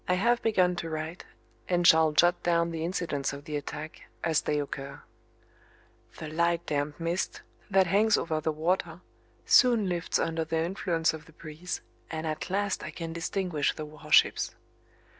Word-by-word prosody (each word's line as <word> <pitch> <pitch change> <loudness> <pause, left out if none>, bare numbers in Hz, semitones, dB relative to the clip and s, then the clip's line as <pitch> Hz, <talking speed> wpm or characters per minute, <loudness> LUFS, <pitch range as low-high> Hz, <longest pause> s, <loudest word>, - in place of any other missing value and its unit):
I 180 - +3
have 235 +6 +2
begun 185 -5 +2
to 165 -1 -4
write, 160 +2 -5 0.4
and 175 -1 +2
shall 160 -1 +6
dot 175 +3 +4
down 170 -1 +1
the 160 -1 -3
incidents 165 -6 -2
of 140 +1 -9
the 155 -2 -4
attack 150 +1 -6 0.2
as 160 -2 +2
they 150 - -1
occur. 140 -1 -6 1.1
The 160 - -6
light 170 +2 0
damp 145 +1 -2
mist 170 +2 -2 0.3
that 195 -1 +4
hangs 210 +4 +3
over 160 -2 -1
the 160 - 0
water 170 +2 -1 0.4
soon 235 -6 +5
lifts 175 -2 0
under 165 0 -1
the 160 0 -2
influence 165 -1 0
of 155 -1 -9
the 160 - -17
breeze, 160 +3 -6 0.3
and 160 0 -4
at 155 +2 -3
last 200 +1 0
I - - -5
can 165 -1 -6
distinguish 170 -2 -1
the 155 - -5
warships. 150 0 +2
165 Hz, 165 wpm, -28 LUFS, 155-180 Hz, 1.1 s, shall